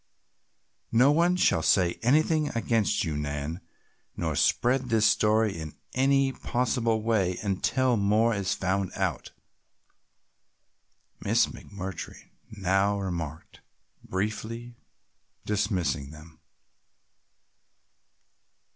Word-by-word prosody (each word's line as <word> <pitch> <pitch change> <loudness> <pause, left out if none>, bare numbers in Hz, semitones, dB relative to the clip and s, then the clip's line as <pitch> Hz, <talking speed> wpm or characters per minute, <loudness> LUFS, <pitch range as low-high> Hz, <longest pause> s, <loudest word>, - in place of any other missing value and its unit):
"No 125 +5 +5
one 170 +4 +3
shall 130 - +2
say 85 +2 +2
anything 155 +4 +2
against 115 -2 +1
you, 80 -2 -2
Nan, 75 +3 -4 0.6
nor - - -2
spread 125 +1 +2
this 110 -2 +3
story 105 -1 +3
in 80 -2 -7 0.2
any 135 +1 +3
possible 120 -3 -1
way 100 -6 +1
until 120 +5 +1
more 105 +3 +2
is 100 -2 -1
found 95 0 -1
out," - - -2 1.9
Miss - - +3
McMurtry 95 -1 -8 0.2
now 100 0 +1
remarked, 85 -5 -6 0.4
briefly 110 +4 -4 0.7
dismissing 95 -9 -1
them. 80 +1 -14
105 Hz, 90 wpm, -27 LUFS, 90-120 Hz, 1.9 s, No